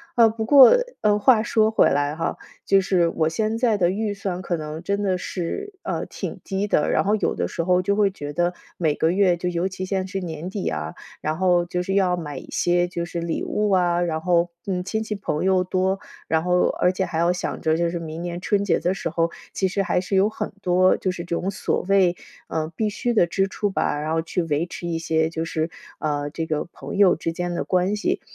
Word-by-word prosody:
啊， 230 -2 +6
不 220 0 -3
过， 270 - +9 0.3
呃， 210 -1 +3
话 220 0 +5
说 220 -2 +3
回 220 - +4
来 145 +1 0
哈， 165 - -2 0.3
就 195 - +5
是 185 -3 +2
我 160 -1 0
现 215 +7 -1
在 230 -2 +2
的 175 -3 +3
预 205 +2 -1
算 190 -3 -4
可 175 -1 -2
能 155 0 -6
真 200 +3 -1
的 190 -2 +1
是， 190 - -4
啊， - - -3
挺 - - -6
低 195 +1 -2
的， 150 - +2
然 - - +2
后 210 +2 +2
有 - - 0
的 - - -2
时 165 - -3
候 180 0 +3
就 200 +2 0
会 205 -2 +4
觉 145 -6 -6
得 175 +3 0 0.2
每 155 -4 +1
个 160 +2 +2
月 185 -2 +3
就 180 +1 -2
尤 175 +1 0
其 190 0 -6
现 190 0 -1
在 - - -7
是 195 0 -4
年 165 0 -5
底 195 0 -4
呀， 75 +1 -3 0.2
然 155 +1 -2
后 180 -2 +3
就 180 +1 -2
是 195 +2 -2
要 185 -2 +3
买 150 -5 -6
一 - - -9
些 175 0 +1
就 170 -1 -4
是 170 0 -4
礼 170 -1 -2
物 210 0 0
啊， 175 -2 +3
然 160 -2 -2
后， 175 0 +2 0.2
嗯， 180 -2 -2
亲 220 +3 -2
戚 215 -1 -4
朋 185 -5 -2
友 185 -1 +3
多， 190 +1 0 0.3
然 160 +1 +1
后 180 0 +3 0.2
而 180 - +3
且 190 - -1
还 170 - -3
要 170 +1 +3
想 180 - -4
着 160 0 +1
就 170 +1 +1
是 170 0 -3
明 160 0 -6
年 175 0 -4
春 200 +2 +1
节 200 - +2
的 180 +2 0
时 185 - -3
候， 165 +1 0 0.2
其 190 - 0
实 195 +2 -1
还 180 - +1
是 195 +2 -2
有 195 +2 +4
很 220 - -4
多 185 +1 +4
就 185 - -1
是 175 -1 -6
这 170 - -2
种 195 - -2
所 190 - -1
谓， 190 -3 +4 0.3
嗯， 160 0 -3
必 215 -1 +1
需 240 +3 -1
的 190 -6 +4
支 195 +3 0
出 205 - -1
吧， 150 -6 -1
然 155 +1 -2
后 165 - +1
去 170 +2 -2
维 155 0 0
持 175 0 -7
一 165 - -1
些 160 -1 +1
就 160 0 -3
是， 160 0 -2 0.3
啊， 145 -1 -1
这 160 +2 -4
个 155 -2 -1
朋 - - -8
友 200 -2 +5
之 165 0 -3
间 175 +1 -3
的 175 - -2
关 185 +3 +1
系。 210 - -1
180 Hz, 265 characters per minute, -23 LUFS, 165-195 Hz, 0.3 s, 过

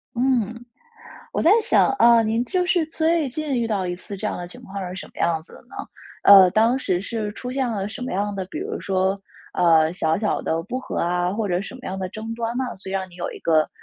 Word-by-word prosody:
嗯， 235 -2 0 0.7
我 - - -1
在 330 - +5
想 455 - +3
啊， 235 -1 +6
您 225 +1 0
就 365 -1 0
是 355 -2 +2
最 320 -1 +1
近 290 0 -3
遇 230 - 0
到 200 -4 -1
一 175 - -2
次 190 +3 -9
这 190 - -4
样 - - -3
的 175 - -5
情 - - -12
况 195 -1 -6
是 180 - -7
什 - - -7
么 - - -23
样 165 -2 +1
子 - - -20
的 - - -13
呢？ - - -16 0.5
呃， 195 -2 +9
当 230 +6 +3
时 180 -8 -1
是 210 +1 -3
出 250 +4 -6
现 265 -2 0
了 200 -3 -2
什 225 - -9
么 255 - -4
样 205 +2 -1
的， 190 -2 -4
比 310 - -7
如 430 +5 -4
说， 190 0 0 0.3
呃， 165 -2 +4
小 160 -3 0
小 210 -1 0
的 165 +1 -1
不 255 +9 -4
和 - - -6
啊， 175 +1 0
或 215 +1 -2
者 180 -1 0
什 200 +6 -8
么 260 - -10
样 190 +1 -4
的 185 -1 -3
争 220 +4 -6
端 230 +1 -3
呢？ 260 - 0
所 190 - -11
以 - - -4
让 190 -1 -2
你 175 - -15
有 175 - -4
一 - - -9
个 155 -2 +2
205 Hz, 275 characters per minute, -23 LUFS, 185-245 Hz, 0.7 s, 呃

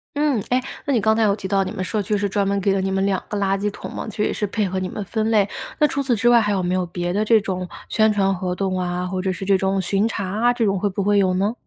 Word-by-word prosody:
嗯， 290 -7 +1
哎， 250 - +3 0.3
那 285 - 0
你 240 - +3
刚 220 +1 +3
才 225 - +1
有 200 -2 +3
提 205 -2 -6
到 195 0 +2
你 - - -5
们 185 - -4
社 215 +2 -1
区 210 +1 -1
是 200 0 0
专 200 0 0
门 200 0 +1
给 195 0 +1
了 195 - 0
你 190 - -1
们 195 0 0
2 195 -2 0
个 210 - -2
垃 195 -1 +1
圾 205 +1 -1
桶 205 - -8
嘛。 - - -5
其 210 - -11
实 210 - +1
也 - - 0
是 210 - -1
配 210 +1 -1
合 190 +1 -2
你 185 0 -3
们 210 - -5
分 220 +2 -1
类， 210 -3 +3 0.3
那 300 - +5
除 280 0 -2
此 260 -3 +1
之 225 +2 +1
外 240 -1 +6
还 210 -1 0
有 190 -2 0
没 180 +1 0
有 185 -1 0
别 175 0 -3
的 205 +2 +1
这 220 +1 +5
种 185 -2 -3 0.2
宣 220 0 +3
传 195 -2 +2
活 180 0 -3
动 190 -1 -1
啊， 180 0 -2
或 185 0 -3
者 190 0 0
是 185 +1 -5
这 195 0 +4
种 195 +1 0
巡 195 +4 +1
查 200 - -3
啊， 225 +6 +2
这 235 -2 0
种 195 -2 +1
会 205 - 0
不 195 +1 -2
会 205 +1 +3
有 185 -2 +2
呢？ 200 +4 +1
200 Hz, 350 characters per minute, -22 LUFS, 190-215 Hz, 0.3 s, 外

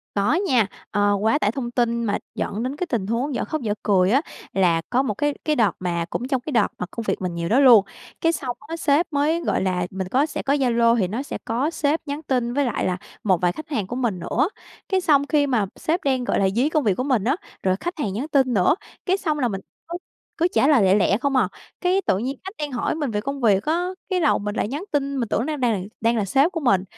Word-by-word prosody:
Có 205 +9 +2
nha. 260 - +2 0.2
Ờ, 205 0 +2
quá 225 +7 +2
tải 205 -4 +1
thông 240 -3 -4
tin 235 -1 0
mà 205 - 0 0.2
dẫn 215 +3 -3
đến 260 +3 -3
cái 360 - -2
tình 220 - -2
huống 245 +5 -1
dở - - -1
khóc 310 -2 -3
dở 210 -3 -1
cười 190 -2 +3
á, 270 +4 +4 0.3
là 175 -4 +3
có 255 +2 +3
một 215 -6 -2
cái 290 +4 0
cái 305 -1 +1
đợt 220 -4 +4
mà 170 -2 -1
cũng 250 - -3
trong 265 -3 0
cái 300 - -6
đợt 230 -4 +4
mà 180 - -3
công 230 - -5
việc - - 0
mình 180 -2 -2
nhiều 170 0 -3
đó 250 +5 +4
luôn. 235 -7 +8 0.4
Cái 330 0 +3
xong 255 -6 -4
á, 330 - -4
sếp 310 +1 +2
mới, 305 +4 +1
gọi - - 0
là, 180 -2 0
mình 190 -1 -4
có 270 +8 +2
sẽ - - -5
có 280 +1 +1
Zalo 235 -3 +3
thì 190 -5 +1
nó 235 +7 -3
sẽ - - -6
có 255 +8 0
sếp 305 -1 0
nhắn 290 +2 -4
tin 245 -4 -1
với 285 0 +2
lại 240 - -1
là 180 -1 0 0.3
một 185 -4 +2
vài 175 -1 +2
khách 310 - -9
hàng 215 -11 -2
của 245 - -5
mình 230 -8 -1
nữa. 260 - 0 0.4
Cái 380 -1 +2
xong 285 -4 +3
khi 290 -2 +2
mà 230 -7 +1
sếp 330 +2 -1
đang, 260 -2 +1
gọi - - 0
là, 195 -1 +3
dí 265 +5 +3
công 305 -4 0
việc 200 -4 +3
của 255 - -2
mình 250 -8 +1
á, 265 +7 +2 0.3
rồi 185 0 +2
khách 350 -1 -4
hàng 205 -9 -1
nhắn 255 +10 -3
tin 265 -5 +2
nữa, 185 - +4 0.3
cái 375 +2 +3
xong 310 -6 -1
là 250 -3 +1
mình 195 -2 -4 0.3
cứ 345 +1 -4 0.4
cứ 340 - +3
trả 270 - +3
lời 275 -9 +5
lẹ 190 0 +5
lẹ 200 -1 +3
không 275 +1 0
à. 220 -8 +3 0.3
Cái 370 +2 +2
tự 190 - +2
nhiên 260 +5 -3
khách 385 +3 -7
đang 295 -2 -4
hỏi 245 - -1
mình 295 -6 -2
về 210 -1 -1
công 275 +4 -4
việc 200 -4 +3
á, 340 +3 0 0.2
cái 370 -2 0
đầu 310 - +3
mình 205 +1 -4
lại - - 0
nhắn 295 +9 -4
tin, 280 -1 0
mình 230 - -2
tưởng - - 0
nó 310 -1 -2
đang - - -9
đà 230 -5 +2 0.2
đang 230 +1 +2
là 210 - +1
sếp 275 - +2
của 330 - -3
mình, 195 -9 +2
250 Hz, 275 wpm, -23 LUFS, 205-290 Hz, 0.4 s, luôn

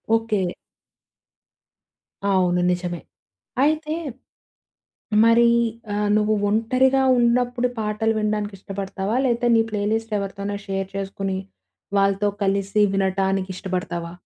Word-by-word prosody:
Okay. 220 -4 0 1.8
అవును 180 -2 +2
నిజమే. 175 -1 -3 0.6
అయితే 310 +1 +1 1.3
మరి 230 +1 +5 0.5
ఆహ్, 210 0 0
నువ్వు 215 0 +2
ఒంటరిగా 255 +5 +2 0.2
ఉన్నప్పుడు 245 +1 +2
పాటలు 215 +1 0
వినడానికి 210 -1 -1
ఇష్టపడతావా 195 +2 -4
లేతే 240 -1 +1
నీ 225 - +5
ప్లే 210 -1 -2
లిస్ట్ 225 0 -2
ఎవరితోన్న 200 +1 -4
షేర్ 195 -1 -2
చేసుకొని, 195 -1 -3 0.6
వాళ్ళతో 195 +1 +2 0.2
కలిసి 200 +1 +1
వినటానికిష్టబడతావా? 185 -3 -1
205 Hz, 95 wpm, -23 LUFS, 195-225 Hz, 1.8 s, మరి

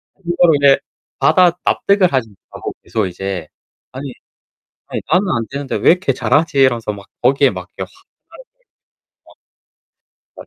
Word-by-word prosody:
그거를 175 -3 +2
이제 140 -1 +5 0.4
받아 180 -2 +5
납득을 200 -3 +2
하지 120 -4 0
못하고 100 - -9
계속 110 -3 -1
이제 95 -2 -5 0.4
'아니 130 0 -7 0.7
아니 - - -4
나는 190 +2 +3
안 115 -1 -2
되는데 140 0 -4
왜 - - +4
이렇게 180 -7 0
잘하지?' 145 +3 +1
이러면서 120 -5 +2
막 100 -1 -11 0.2
거기에 135 +2 +4
막 90 0 -8
그냥 - - -4
확 380 0 -23 0.3
하루종일 - - -16 1.8
막 - - -11
135 Hz, 305 characters per minute, -17 LUFS, 110-175 Hz, 1.8 s, 이제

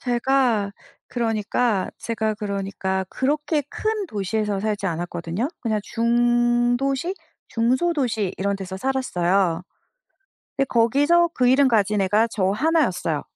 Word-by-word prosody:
제가 245 -4 +1 0.4
그러니까 225 -2 0
제가 220 -2 -2
그러니까 195 -2 -3
그렇게 295 - 0
큰 430 -2 -2
도시에서 210 - -2
살지 210 -1 -2
않았거든요. 175 - -3
그냥 215 -3 -1
중도시 240 - +1 0.3
중소도시 245 - 0
이런 200 +1 -1
데서 190 -1 -6
살았어요. 190 -8 0 0.9
근데 275 - +1
거기서 290 +9 +3
그 250 -1 +2
이름 265 +1 +5
가진 210 -3 +2
애가 210 +4 +2
저 190 -4 0
하나였어요. 205 - +1
230 Hz, 280 characters per minute, -23 LUFS, 195-260 Hz, 0.9 s, 이름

